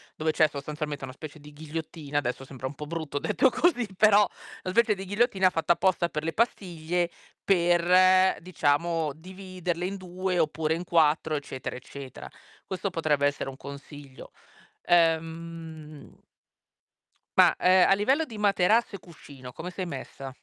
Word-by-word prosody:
dove 155 0 0
c'è 155 0 +4
sostanzialmente 150 0 -5
una 130 - -6
specie 155 +2 -10
di 150 +1 -13
ghigliottina, 150 -1 -4
adesso 130 0 -4
sembra 130 -1 -6
un 145 - -8
po' 150 - -7
brutto 155 -2 -4
detto 260 - +2
così, 250 -7 +1
però 210 0 +6 0.4
una 185 - -4
specie 235 -1 +3
di 195 - -7
ghigliottina 200 -2 +2
fatta 165 0 +2
apposta 180 -1 +1
per 150 - -4
le 165 - -1
pastiglie 175 -6 -1 0.3
per, 185 +1 +4
diciamo, 165 -2 0
dividerle 180 0 -5
in 195 +2 -4
2 185 -1 -3
oppure 160 0 0
in 175 +2 -6
4 160 -2 +2
eccetera, 140 -3 -5
eccetera. 130 +1 -10 0.4
Questo 190 +1 -3
potrebbe 155 -5 0
essere 145 -1 -3
un 135 - -10
consiglio. 140 -1 -11 0.5
Ehm 165 -2 -1 1.1
ma, - - +7
uhm, 185 0 +5
a - - +5
livello 265 +11 +2
di 230 -6 -10
materasso 205 +2 +2
e - - -12
cuscino 140 -8 -13
come 175 +7 -7
sei 185 0 -5
messa? 135 -2 -7
165 Hz, 150 wpm, -27 LUFS, 150-185 Hz, 1.1 s, ma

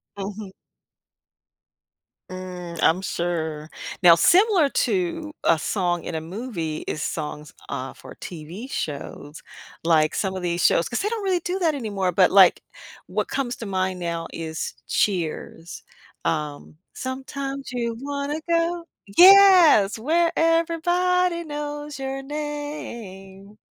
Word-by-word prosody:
Mhm. 200 0 -6 1.8
Mm, 180 -2 -7
I'm 170 +3 +3
sure. 160 -4 -3 0.3
Now 170 -2 +9
similar 365 - +5
to 340 - -1
a - - +5
song 175 0 -1
in - - -5
a 160 - -1
movie 170 -3 -5
is 155 - -4
songs, 150 -1 -5 0.2
uh, 135 -1 -4
for - - -13
TV 175 +8 -8
shows, 145 - -6 0.4
like 155 -2 +3
some 190 -2 -2
of 185 - -4
these 175 -1 -1
shows 170 - +3
'cause 240 - -2
they 405 - -1
don't 450 -2 -3
really 375 -2 +1
do 355 +2 -3
that 330 -4 +2
anymore, 200 -8 -2
but, 180 +1 +4
like, 190 -2 +6 0.4
what - - -3
comes 250 -3 -2
to 230 - -7
mind 185 -2 -1
now 170 -1 -3
is 160 -1 -4
Cheers. 170 -3 -2 0.4
Um, 150 -1 -3 0.2
"Sometimes 270 +1 -5
you 235 -2 -2
wanna 285 +3 -3
go" 335 +1 +1 0.3
Yes, 365 - +8
"Where 330 +8 +1
everybody 340 +2 +1
knows 295 -1 -5
your 270 0 -4
name." 235 -10 -7
220 Hz, 125 wpm, -23 LUFS, -, 1.8 s, Now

